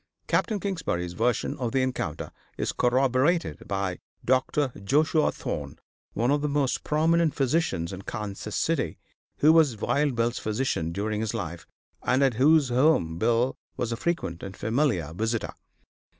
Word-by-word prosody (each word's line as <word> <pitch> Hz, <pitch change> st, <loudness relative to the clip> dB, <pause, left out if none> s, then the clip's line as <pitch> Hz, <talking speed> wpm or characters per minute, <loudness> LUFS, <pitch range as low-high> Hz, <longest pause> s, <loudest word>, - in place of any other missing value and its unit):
Capt. -, -, +1 dB
Kingsbury's 150 Hz, -, -2 dB
version 120 Hz, +6 st, 0 dB
of 120 Hz, -3 st, -2 dB
the 130 Hz, -1 st, +2 dB
encounter 105 Hz, -12 st, -3 dB, 0.3 s
is -, -, -1 dB
corroborated 130 Hz, +7 st, +1 dB
by 95 Hz, -3 st, -2 dB, 0.3 s
Dr. 130 Hz, +1 st, +1 dB
Joshua 155 Hz, +8 st, +3 dB
Thorne, -, -, -5 dB, 0.4 s
one 120 Hz, +5 st, +1 dB
of 145 Hz, 0 st, +2 dB
the 150 Hz, -, 0 dB
most 140 Hz, -3 st, 0 dB
prominent 160 Hz, +1 st, +2 dB
physicians 130 Hz, -, 0 dB
in 95 Hz, -, -6 dB
Kansas 105 Hz, 0 st, -5 dB
City, 150 Hz, -, 0 dB, 0.4 s
who 155 Hz, +2 st, +7 dB
was 150 Hz, -8 st, +4 dB
Wild 140 Hz, +5 st, +1 dB
Bill's 115 Hz, +1 st, 0 dB
physician 105 Hz, -7 st, -1 dB
during 105 Hz, +4 st, -2 dB
his 110 Hz, -2 st, -2 dB
life, 85 Hz, +1 st, -5 dB, 0.3 s
and 130 Hz, +2 st, +2 dB
at 135 Hz, -2 st, +3 dB
whose 140 Hz, +3 st, +4 dB
home 120 Hz, -, +2 dB
Bill 120 Hz, +4 st, +2 dB, 0.2 s
was 120 Hz, -1 st, -2 dB
a -, -, 0 dB
frequent 115 Hz, -, -2 dB
and 95 Hz, 0 st, -8 dB
familiar 110 Hz, -, 0 dB
visitor. 110 Hz, +4 st, -2 dB
125 Hz, 150 wpm, -26 LUFS, 105-145 Hz, 0.4 s, who